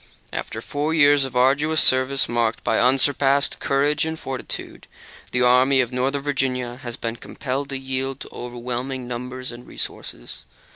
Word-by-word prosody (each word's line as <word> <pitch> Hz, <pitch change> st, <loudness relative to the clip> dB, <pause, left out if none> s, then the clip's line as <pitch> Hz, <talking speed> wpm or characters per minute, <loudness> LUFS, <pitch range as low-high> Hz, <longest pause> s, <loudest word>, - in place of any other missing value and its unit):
After -, -, -4 dB
four 150 Hz, +3 st, -1 dB
years 145 Hz, -2 st, +5 dB
of 130 Hz, -2 st, -7 dB
arduous 140 Hz, +5 st, +3 dB
service, 130 Hz, +1 st, +4 dB
marked 120 Hz, -1 st, 0 dB
by -, -, +2 dB
unsurpassed 135 Hz, +2 st, +3 dB
courage 145 Hz, +2 st, +2 dB
and 160 Hz, 0 st, -2 dB
fortitude, 135 Hz, -4 st, -6 dB, 0.4 s
the 125 Hz, 0 st, +2 dB
Army 130 Hz, +2 st, +5 dB
of 125 Hz, -1 st, +1 dB
Northern 135 Hz, +2 st, 0 dB
Virginia 130 Hz, -4 st, -1 dB
has 120 Hz, -2 st, -5 dB
been 115 Hz, 0 st, -4 dB
compelled 135 Hz, +3 st, -4 dB
to 135 Hz, -, -3 dB
yield 130 Hz, 0 st, -3 dB
to -, -, -7 dB
overwhelming 125 Hz, +1 st, -4 dB
numbers 125 Hz, +1 st, -5 dB
and 120 Hz, +1 st, -11 dB
resources. -, -, -6 dB
130 Hz, 150 wpm, -23 LUFS, 125-140 Hz, 0.4 s, years